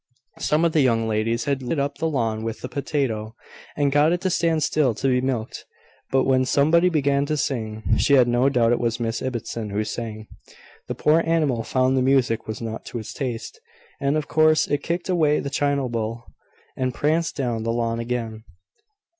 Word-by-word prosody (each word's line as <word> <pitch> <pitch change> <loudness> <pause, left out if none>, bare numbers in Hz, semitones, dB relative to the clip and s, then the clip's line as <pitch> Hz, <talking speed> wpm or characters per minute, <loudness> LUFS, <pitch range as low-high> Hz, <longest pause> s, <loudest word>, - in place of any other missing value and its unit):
Some 155 +3 +2
of 165 - +2
the 155 - +3
young 115 -4 +2
ladies 110 +2 0
had 140 -2 -1
lured 125 - -2
it 155 - -1
up 140 +1 -2
the 160 - 0
lawn 115 -6 -1
with 115 0 -5
a - - -3
potato, 125 -6 -2 0.4
and 145 -1 +2
got 145 +3 +4
it 175 0 0
to 185 - 0
stand 165 -3 +1
still 140 -5 +1
to 130 - -1
be 125 -1 +2
milked; 125 -4 -3 0.5
but, 135 0 +2
when 130 -1 +3
somebody 155 +7 +3
began 140 -3 +1
to 155 0 -1
sing 110 -6 -3 0.2
(she 140 - +3
had 125 -2 +5
no 120 +3 +3
doubt 120 -3 +2
it 120 - +2
was 115 -1 -1
Miss 115 0 -2
Ibbotson 120 -4 -4
who 105 +2 -1
sang) 110 0 -5 0.6
the - - -4
poor 155 +2 +3
animal 155 -8 +1
found 130 +3 +1
the 130 - +2
music 130 -3 +2
was 110 +1 -5
not 110 0 -5
to - - -6
its 110 - -7
taste, 130 - -5 0.4
and, 140 +1 +1
of 155 - -3
course, 155 0 +3
it 145 0 -1
kicked 170 +3 -3
away 155 -5 +2
the 140 - -4
china 140 -2 0
bowl, 115 0 -3 0.5
and 130 -1 -2
pranced 160 +3 0
down 120 -5 -2
the 115 +1 -1
lawn 115 0 -1
again. 115 -2 -4
130 Hz, 205 wpm, -23 LUFS, 115-145 Hz, 0.6 s, had